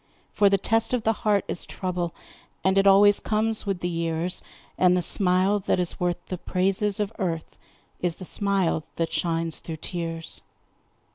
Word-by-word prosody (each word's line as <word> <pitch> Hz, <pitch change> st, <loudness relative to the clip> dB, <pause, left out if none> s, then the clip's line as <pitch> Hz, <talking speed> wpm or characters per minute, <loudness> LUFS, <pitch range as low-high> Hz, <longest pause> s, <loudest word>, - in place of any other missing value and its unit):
For 205 Hz, -1 st, +4 dB
the 195 Hz, -, +3 dB
test 225 Hz, +5 st, +1 dB
of 240 Hz, -, -3 dB
the 225 Hz, -, +2 dB
heart 210 Hz, -3 st, 0 dB
is -, -, -1 dB
trouble, 180 Hz, -2 st, -3 dB, 0.5 s
And 190 Hz, 0 st, +2 dB
it 195 Hz, -, +3 dB
always 200 Hz, +1 st, +6 dB
comes 220 Hz, 0 st, -1 dB
with 190 Hz, -3 st, -2 dB
the 175 Hz, -, -1 dB
years, 165 Hz, +1 st, -2 dB, 0.3 s
And 180 Hz, 0 st, +4 dB
the 180 Hz, -, 0 dB
smile 190 Hz, +3 st, +5 dB
that 185 Hz, -, 0 dB
is 180 Hz, -1 st, -1 dB
worth 175 Hz, -1 st, 0 dB
the 185 Hz, -, -6 dB
praises 195 Hz, +3 st, 0 dB
of 210 Hz, +1 st, -2 dB
earth 165 Hz, -5 st, -3 dB, 0.4 s
Is 175 Hz, -2 st, -1 dB
the 185 Hz, -, -10 dB
smile 195 Hz, -5 st, 0 dB
that 165 Hz, -1 st, -2 dB
shines 165 Hz, -1 st, -1 dB
through 160 Hz, -1 st, -7 dB
tears. 165 Hz, -1 st, -4 dB
185 Hz, 170 wpm, -25 LUFS, 170-200 Hz, 0.5 s, always